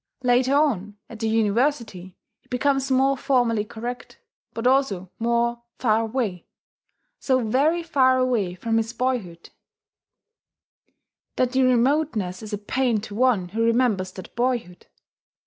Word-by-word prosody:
Later 250 +2 +3
on, 210 -9 0
at 230 - -9
the 225 0 -1
University, 220 -4 0 0.2
he - - -34
becomes 270 +1 0
more 270 +1 +3
formally 245 -5 +1
correct, 235 +3 -7 0.3
but 230 - -6
also 250 -9 +1
more 235 +1 0 0.2
far 225 -2 +2
away, 220 -6 -3 0.7
so 260 -2 +1
very 305 +9 +2
far 260 -6 +3
away 235 -8 0
from 225 +5 -1
his 225 +1 -1
boyhood 225 -9 -3 1.8
that 255 -1 +1
the 265 0 +2
remoteness 250 - +1
is 215 -1 -8
a 205 - -2
pain 235 +2 0
to 210 -1 -9
one 220 -6 +1
who 225 +5 -1
remembers 230 -5 +1
that 185 - -11
boyhood. 240 -7 -2
235 Hz, 130 wpm, -23 LUFS, 210-260 Hz, 1.8 s, Later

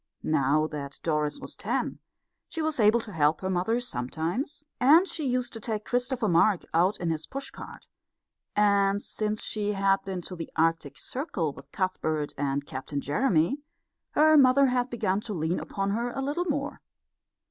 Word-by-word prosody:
Now 155 0 +2
that 140 -3 -6
Doris 150 -2 0
was - - -8
ten - - -2 0.5
she 330 - -6
was 310 -3 0
able 215 +2 +5
to 220 - -10
help 155 -3 +2
her 190 0 -1
mother 185 +6 +1
sometimes, 170 - -3 0.2
and 315 +9 +6
she 310 -6 -3
used 250 0 -1
to 225 - -6
take 215 -1 -3
Christopher 245 -2 0
Mark 180 +2 +3
out 180 +5 +3
in 170 -2 0
his 160 -1 -3
push 275 0 -5
cart; - - -11 0.7
and 200 -1 +3
since 215 0 -2
she 210 -1 -1
had 195 0 +2
been 190 -2 -4
to 180 - -6
the 165 -2 -7
Arctic 160 -4 +1
Circle 195 - -3
with 140 - -14
Cuthbert 160 -6 -1
and 140 0 -1
Captain 135 +2 -4
Jeremy 165 - +1 0.5
her 310 +1 +6
mother 275 0 +6
had 250 -1 +1
begun 210 -4 0
to 210 -2 -5
lean 160 +2 0
upon 195 0 -2
her 235 +4 -1
a 260 - -5
little 290 +6 -1
more. 290 -3 -2
200 Hz, 170 wpm, -28 LUFS, 160-245 Hz, 0.7 s, and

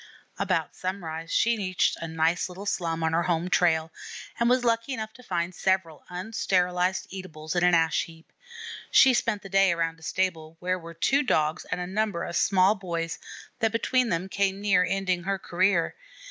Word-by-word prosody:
About - - 0
sunrise 165 -3 -5
she 235 0 +3
reached 185 -3 +1
a 165 - -5
nice 165 +2 0
little 185 +3 -8
slum 165 -5 -1
on 160 0 +1
her 165 - +3
home 175 +1 -1
trail, 160 -2 +2 0.5
and 235 0 +3
was 250 0 +3
lucky 230 +3 +1
enough 220 -1 -5
to 250 - -15
find 175 -6 -2
several 190 -4 -1
unsterilized 180 -1 0
eatables 175 -4 -6
in 175 - +2
an 180 -1 +5
ash 165 -1 +2
heap. 165 0 -16 0.6
She 265 - +7
spent 230 -4 0
the - - -7
day 195 -1 +4
around 165 -1 -1
a - - -22
stable 165 -1 -2
where 185 +1 -1
were 165 0 -10
two 270 - +2
Dogs 155 - 0
and 180 - -3
a 180 - -2
number 195 -2 -1
of 170 - -5
small 190 0 +4
boys, 170 -4 -4 0.4
that 225 -1 +2
between 250 +2 +1
them 175 +2 -1
came 195 0 0
near 200 -3 +3
ending 185 -1 0
her 195 +3 -1
career. 185 -1 +1
180 Hz, 185 wpm, -27 LUFS, 165-195 Hz, 0.6 s, She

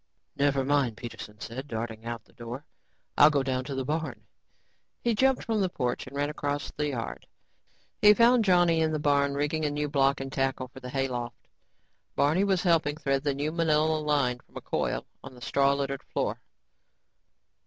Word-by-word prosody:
"Never 140 -1 +2
mind," 135 -5 +1
Peterson 105 -3 -8
said, 130 +5 -6
darting 115 -2 -5
out 115 -2 -5
the - - -25
door, 120 +5 -8 0.5
"I'll 150 - +9
go 145 -3 +1
down 130 -1 -1
to 140 - -4
the 130 -1 -2
barn." 155 +3 -3 0.8
He 235 - +2
jumped 265 +4 +2
from 220 -2 0
the 190 - +1
porch 125 -8 -2
and 135 - -10
ran 145 +1 0
across 145 -1 -3
the 150 0 -2
yard. 125 -5 -5 0.7
He 210 0 +8
found 235 +1 +5
Johnny 175 -4 +4
in 160 0 +1
the - - +1
barn, 140 -1 +2
rigging 150 +2 -1
a 150 - +1
new 150 0 -2
block 140 -1 +2
and 135 0 -6
tackle 135 -2 -1
for 130 - -12
the 125 - -8
hayloft. 125 -3 -3 0.7
Barney 155 +7 +3
was 190 -3 +1
helping 160 -4 +2
thread 135 -3 0
the 145 -2 0
new, 145 +2 -1
manila 155 -1 +2
line 140 -5 +1
from - - -14
a - - -6
coil - - -2 0.2
on 130 -1 -10
the - - -13
straw 140 +4 +2
littered 140 -1 -2
floor. - - -3
145 Hz, 185 wpm, -28 LUFS, 130-155 Hz, 0.8 s, I'll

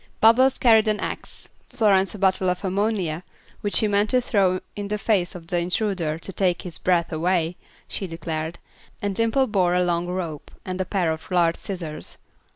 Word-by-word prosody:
Bubbles 250 +4 +5
carried 225 -3 +5
an 210 -1 +1
axe, - - -6 0.2
Florence 205 -5 +2
a - - -6
bottle 190 -1 +2
of 180 +2 -2
ammonia, 190 -4 -1 0.4
which 205 - 0
she 215 - +4
meant 205 +1 +2
to 255 - +3
throw 195 -6 +2 0.2
in 205 -1 -4
the 210 +1 -1
face 195 -4 0
of 170 -2 -9
the 175 +1 0
intruder 175 -3 -1
"to 190 +4 -7
take 180 -1 +1
his 175 -3 -6
breath 175 -2 +1
away," 170 +1 +1 0.3
she 195 - -4
declared; 165 0 -4 0.4
and 205 -1 -2
Dimple 230 +6 +2
bore 185 -6 +2
a 180 - +3
long 175 0 0
rope 175 -5 -4 0.2
and 185 0 -3
a - - -1
pair 180 -5 0
of 160 -1 -6
large 170 -2 +3
scissors. 170 -6 -6
185 Hz, 185 wpm, -24 LUFS, 170-205 Hz, 0.4 s, Bubbles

